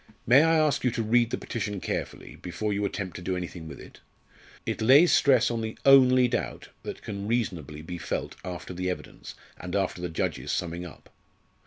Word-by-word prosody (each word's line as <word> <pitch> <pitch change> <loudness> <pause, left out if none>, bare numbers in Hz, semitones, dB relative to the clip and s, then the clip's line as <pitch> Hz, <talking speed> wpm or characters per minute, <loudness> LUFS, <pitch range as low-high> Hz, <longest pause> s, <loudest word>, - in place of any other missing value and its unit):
"May 130 +5 +7
I 165 +1 +4
ask 155 -2 +2
you 125 - +3
to 115 -1 -2
read 115 +2 +3
the - - -2
petition 105 -4 -4
carefully, - - -5
before 95 +4 -3
you 100 +1 -1
attempt 100 -2 -4
to - - -8
do 90 +1 -2
anything 85 -2 -6
with 75 - -9
it? - - -13 0.7
It - - -3
lays 140 +10 +6
stress 130 -4 +4
on 115 -1 -2
the 110 0 -5
only 130 -2 +7
doubt 70 - -3
that - - -7
can 100 -1 -5
reasonably 85 - -2
be 90 +1 -6
felt 80 - -4
after 90 0 -6
the 90 +1 -2
evidence, 90 - -7 0.2
and 90 +1 -5
after 95 -3 -1
the 90 - -3
judge's 80 - -2
summing 85 0 -3
up. 80 - -16
100 Hz, 195 wpm, -27 LUFS, 90-120 Hz, 0.7 s, May